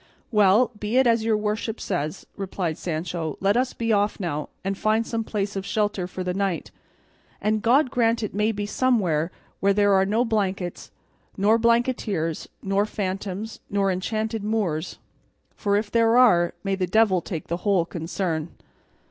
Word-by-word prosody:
"Well, 210 +2 +4
be 210 +4 -1
it 260 - +5
as 230 -2 +3
your 220 -1 +2
worship 215 +1 -2
says," 165 -2 -3
replied 185 -4 -3
Sancho; 165 -2 -3
"let 200 +2 +2
us 255 +1 +1
be 230 -1 0
off 205 0 +1
now 150 -6 -3
and 195 +1 -1
find 215 +3 +1
some 225 -1 -2
place 205 -2 -3
of 195 - -2
shelter 205 -3 -1
for 185 0 -5
the 180 0 -2
night, 195 -2 -2 0.7
and 215 0 0
God 255 +4 +3
grant 230 -1 +2
it 210 - -3
may 210 +2 +1
be 205 -1 -3
somewhere 190 -9 +1 0.3
where 200 0 +3
there 205 0 +3
are 190 0 +4
no 225 +5 +2
blankets, 195 -5 -2 0.5
nor 210 +3 +4
blanketeers, 230 -8 0 0.2
nor 195 +2 +1
phantoms, 195 +1 -4
nor 200 -1 +1
enchanted 215 +4 -2
Moors; 190 -7 -1 0.6
for 200 -2 0
if 205 0 -2
there 230 0 +4
are, 175 -9 +5
may 195 -1 -1
the 190 -1 -1
devil 200 -2 +3
take 165 -2 -5
the 170 - -2
whole 185 -2 +1
concern." 170 -1 -3
205 Hz, 165 wpm, -24 LUFS, 185-220 Hz, 0.7 s, it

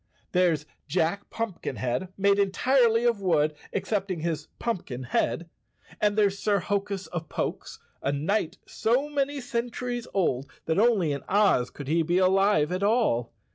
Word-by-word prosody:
There's 175 -5 +2 0.2
Jack 185 +3 0
Pumpkinhead, 170 - -3
made 200 +1 +3
entirely 230 +3 +3
of 230 -4 +2
wood, 155 -5 +2 0.2
excepting 195 -5 -2
his 160 -2 -2
pumpkin 170 - -3
head, 150 +6 0 0.5
and 210 0 +2
there's 200 -2 +2
Sir 205 -1 +2
Hokus 200 +1 -2
of 165 -1 -6
Pokes, - - -4 0.2
a 140 - 0
knight 165 +5 -1
so 250 +7 0
many 285 0 -1
centuries 245 0 -3
old 140 -9 0 0.2
that 160 +4 +1
only 210 -9 +3
in 140 -1 -3
Oz 200 -11 +3
could 145 - -9
he 165 +3 +2
be 170 +3 +1
alive 185 -4 +3
at 185 +1 -1
all. 200 - +2
195 Hz, 145 wpm, -27 LUFS, 160-220 Hz, 0.5 s, made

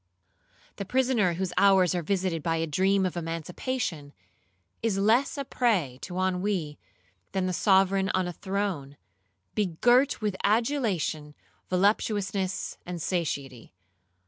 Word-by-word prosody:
'The 200 - -4
prisoner 245 -6 +2
whose 180 +1 -3
hours 190 -3 +5
are 175 - -1
visited 180 -1 -1
by 165 +2 0
a 165 0 0
dream 190 +5 +2
of 180 - -2
emancipation, 165 - -4 0.7
is 225 -4 0
less 225 +9 +2
a 280 - -3
prey 190 - 0
to 180 0 -6
ennui 185 -4 -1 0.5
than 190 -1 0
the 185 - -1
sovereign 190 +1 +3
on 185 -1 +1
a 175 - -4
throne, 190 -7 -3 0.6
begirt 240 - +2
with 210 -3 -1
adulation, 210 - 0 0.3
voluptuousness, 195 0 0
and 175 -1 -6
satiety. 140 - -3
190 Hz, 120 wpm, -27 LUFS, 165-205 Hz, 0.7 s, hours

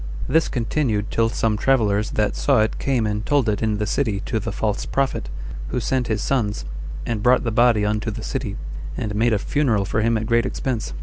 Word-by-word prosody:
This 160 +4 +3
continued 115 -4 -1
till 115 0 +2
some 110 -1 0
travelers 110 -6 +2
that 105 -1 +1
saw - - +3
it 110 - -1
came 130 -5 +1
and 105 0 -1
told 140 -2 +2
it 105 -1 0
in 110 -2 +1
the 105 - -1
city 105 -2 0
to 110 - -2
the 110 +2 -4
false 105 +1 -1
prophet, 135 - -1 0.4
who - - -1
sent 125 +1 0
his 110 -1 -1
sons, 110 -7 0 0.4
and 115 -3 -2
brought 125 +3 +4
the 115 - -1
body 115 -2 +4
unto 105 +2 0
the 105 - -6
city, 125 -7 -3 0.4
and 105 -1 -2
made 115 +3 +2
a 110 - +3
funeral 110 -3 +1
for 110 - 0
him 115 +1 +2
at 110 - -2
great 115 +2 +2
expense. 125 -3 -3
110 Hz, 210 wpm, -22 LUFS, 105-125 Hz, 0.4 s, brought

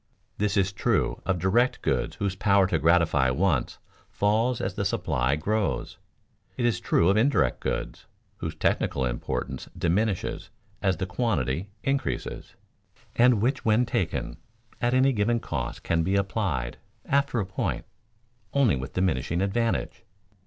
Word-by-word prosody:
This 105 -1 +1
is 95 0 +2
true 100 - 0
of 95 -2 +1
direct 105 +9 +1
goods - - 0
whose 100 -2 -2
power 100 0 +4
to 85 -3 0
gratify 80 -5 +3
wants 75 0 0 0.3
falls 110 +4 +1
as 95 - -2
the 100 - -2
supply 75 -9 0
grows; 105 +7 -2 0.6
it 125 - 0
is 120 - +1
true 85 - +2
of 100 - +3
indirect 135 +6 +2
goods, - - -4 0.3
whose - - -5
technical 65 - 0
importance - - -4
diminishes 95 +3 -1 0.3
as 95 -3 +1
the 95 - -2
quantity 90 - -1
increases, 135 - -2 0.6
and 120 -3 +4
which 130 +2 0
when 110 +3 +3
taken 95 -7 -2 0.4
at 120 +1 +2
any 135 +1 +4
given 115 +2 +1
cost 65 - -4
can 85 0 +1
be 95 +4 0
applied, 95 - -1 0.3
after 140 -3 +1
a 100 - 0
point, 95 0 -3 0.7
only 130 - +4
with 65 +2 -6
diminishing 85 -3 0
advantage. 115 +4 -1
100 Hz, 140 wpm, -26 LUFS, 85-115 Hz, 0.7 s, power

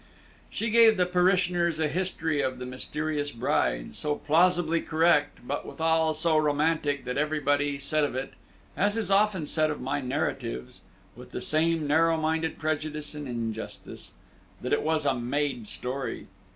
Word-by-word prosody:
She 225 0 -2
gave 225 -1 +6
the 180 - +3
parishioners 180 -2 +2
a 160 -1 +1
history 165 -3 -1
of 130 -1 -2
the 125 - -6
Mysterious 145 +3 -3
Bride, 115 - -1
so 150 -1 -2
plausibly 170 +2 +2
correct, 160 -5 +2
but 145 - -2
withal 160 -1 +1
so 160 0 +3
romantic, 150 -1 +1
that 125 +2 -2
everybody 145 -1 +1
said 150 +2 0
of 145 - -1
it 130 +1 -4 0.4
(as 205 +3 +1
is 210 -4 -2
often 195 -4 +3
said 155 +1 +1
of 150 - -3
my 135 +2 -2
narratives, 65 - -3 0.3
with - - -12
the - - -5
same 160 0 +1
narrow 165 +3 +3
minded 160 0 -1
prejudice 155 -1 -3
and 150 -1 -6
injustice) 115 -2 -6 0.5
that 125 - -2
it - - +2
was 155 -1 0
a 140 - +3
made 125 -1 -2
story. 130 +4 -4
155 Hz, 155 wpm, -27 LUFS, 145-165 Hz, 0.5 s, gave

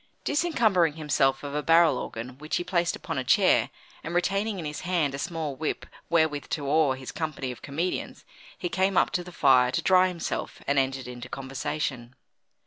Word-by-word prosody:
Disencumbering 225 - +2
himself 140 -3 +1
of 140 -1 -5
a 150 - 0
barrel 165 -1 +5
organ 125 +3 -7
which 155 +1 -3
he - - 0
placed 175 -1 0
upon - - -4
a - - -2
chair, 125 - +4 0.3
and 170 - -5
retaining 195 +4 0
in 170 - -5
his 150 0 -4
hand 170 -6 0
a 140 - -4
small 155 -3 -3
whip 155 +3 -3 0.2
wherewith 160 -3 +2
to 145 -3 -3
awe 150 -1 +3
his 130 -1 -7
company 155 -5 -3
of 125 - -10
comedians, 160 +6 -3 0.3
he 175 - -3
came 190 +1 +1
up - - +4
to 180 - -1
the 180 - -10
fire 125 -6 +4
to - - -1
dry 185 0 +5
himself, 175 -3 -4
and 140 0 +2
entered 135 -1 -1
into 125 0 -8
conversation. 130 -2 -4
155 Hz, 190 wpm, -27 LUFS, 135-175 Hz, 0.3 s, barrel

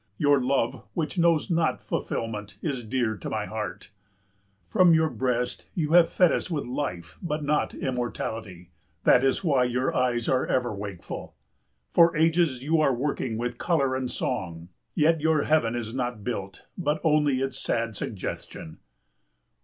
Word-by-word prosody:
Your 145 -2 +4
love 130 -2 0
which 165 +2 -2
knows 170 +1 +3
not 165 -10 +1
fulfilment 105 0 -4
is 135 -6 -2
dear 115 -1 -1
to - - -6
my 110 -1 -2
heart. 110 0 -6 0.8
From 170 - +5
your 160 0 +2
breast 125 -1 -2
you 155 -3 -1
have 170 -1 +6
fed 180 -3 +4
us - - -1
with 155 -5 -2
life 90 - -4
but 155 -3 -2
not 150 +1 0
immortality, 110 -8 -4 0.3
that 125 - +5
is 135 +8 +2
why 140 -7 +3
your 125 +1 0
eyes 120 -2 +1
are 130 0 +2
ever 125 -3 0
wakeful. 100 -3 -7 0.6
For 170 -1 +5
ages 160 -5 +2
you 155 +2 +2
are 135 -4 +3
working 130 -3 -2
with 120 +1 -3
colour 140 -7 +1
and 130 -1 -2
song, 85 -11 -3 0.3
yet 160 -1 +3
your 160 -1 +3
heaven 150 -7 +2
is 115 -2 -4
not 120 -4 -3
built, 100 -5 -5
but 155 -3 -1
only 150 -4 +3
its 135 0 -2
sad 115 -2 -1
suggestion. 90 -6 -6
130 Hz, 155 wpm, -26 LUFS, 115-155 Hz, 0.8 s, have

